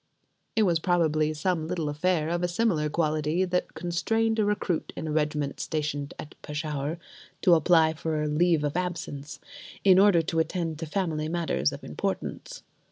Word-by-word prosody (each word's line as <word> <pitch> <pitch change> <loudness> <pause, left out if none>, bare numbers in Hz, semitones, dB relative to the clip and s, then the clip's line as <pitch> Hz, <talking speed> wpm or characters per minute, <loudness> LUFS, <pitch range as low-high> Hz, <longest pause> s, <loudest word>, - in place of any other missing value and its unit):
It 220 - +4
was 170 -5 +2
probably 155 -3 +2
some 160 0 -1
little 170 -3 -2
affair 155 +2 0
of 175 +1 -1
a 175 - +1
similar 175 -5 +1
quality 155 +2 0
that 180 0 -2
constrained 225 +7 0
a - - +4
recruit 205 -5 -1
in - - -5
a - - -2
regiment 150 -2 -1
stationed 150 -2 -3
at 150 - -9
Peshawur 150 0 -3 0.5
to 180 - +6
apply 160 -1 +4
for 155 -1 -2
leave 160 +1 +2
of 145 +1 -1
absence: 160 -5 -4 0.4
in 190 -1 +7
order 195 -4 +5
to 165 0 -1
attend 165 -2 -1
to 165 - -4
family 155 -3 -1
matters 160 - 0
of - - -9
importance. - - -4
160 Hz, 165 wpm, -27 LUFS, 150-180 Hz, 0.5 s, in